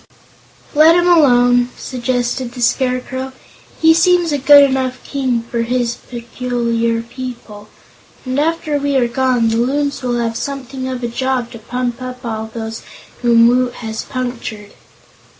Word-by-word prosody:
"Let 315 +2 +6
him 350 0 +3
alone," 245 -7 +4
suggested 245 0 -2
the 245 - -7
Scarecrow. 260 +1 -1 0.5
"He 320 0 +6
seems 345 0 +3
a 290 - 0
good 285 +2 +8
enough 260 -1 -1
king 255 -4 -1
for 235 0 -3
his 240 0 -1
peculiar 235 -1 -2
people, 235 -4 -9 0.6
and 255 +2 -1
after 310 -1 0
we 285 0 -1
are 250 -3 +3
gone, 245 -1 +1
the 225 - 0
Loons 280 +3 0
will 245 -2 -1
have 230 -1 -2
something 265 -1 -5
of 255 -1 -5
a - - 0
job 250 0 -2
to 230 - -10
pump 245 +2 -4
up 255 0 -7
all 220 -1 -4
those 225 0 -6 0.4
whom 235 -1 +5
Woot 245 +1 +2
has 220 -1 -5
punctured." 235 -5 -6
250 Hz, 150 wpm, -17 LUFS, 235-265 Hz, 0.6 s, good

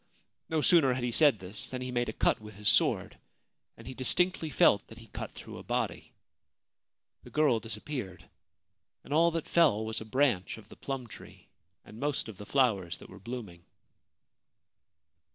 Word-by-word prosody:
No 160 -1 +1
sooner 145 -6 +5
had 125 0 -3
he 120 - 0
said 145 -1 +5
this 100 +2 -7
than 130 - -4
he 125 - -4
made 120 0 0
a - - -4
cut - - +1
with 105 -1 -11
his 105 0 -5
sword, - - +2 0.6
and 115 - -13
he 130 - -6
distinctly 165 +6 +2
felt 105 -7 +4
that 115 - -13
he 115 - -12
cut - - -7
through - - -9
a - - -10
body. - - -3 1.1
The - - -13
girl 150 -7 +3
disappeared, 110 - -7 0.8
and 145 - -6
all 165 +2 +5
that 165 -1 -3
fell 140 -11 +3
was 110 0 -3
a - - -7
branch 115 -6 +1
of 110 -1 -15
the - - -12
plum 135 -2 -5
tree 95 -4 -14 0.4
and 110 - -12
most 145 -3 -1
of 110 -4 -9
the 105 - -10
flowers 105 -11 +1
that - - -14
were 95 - -12
blooming. 105 -6 -8
120 Hz, 180 wpm, -30 LUFS, 105-140 Hz, 1.1 s, sooner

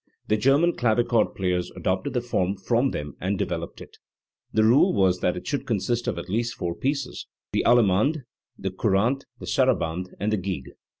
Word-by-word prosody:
The 110 - +4
German 140 +10 +3
clavichord 120 -1 +2
players 90 -2 -1
adopted 95 0 -1
the 125 - 0
form 100 -5 -1
from 120 +7 +1
them 75 - -5
and 95 +2 -1
developed - - -4
it. - - -13 0.5
The 110 - +3
rule 125 - +5
was 95 -3 +2
that 90 0 0
it - - -7
should 145 - -3
consist 115 +2 -1
of - - -1
at - - -6
least 115 +5 -1
four 85 -1 -3
pieces, 140 +5 -3 0.3
the - - +1
allemande, 120 - +3 0.3
the 95 - -3
cou 95 +4 -2
rante, 120 +8 +1
the - - -8
sarabande, 85 +3 +1
and 105 +2 0
the - - +2
gigue. 90 -8 -4
105 Hz, 185 wpm, -25 LUFS, 95-120 Hz, 0.5 s, rule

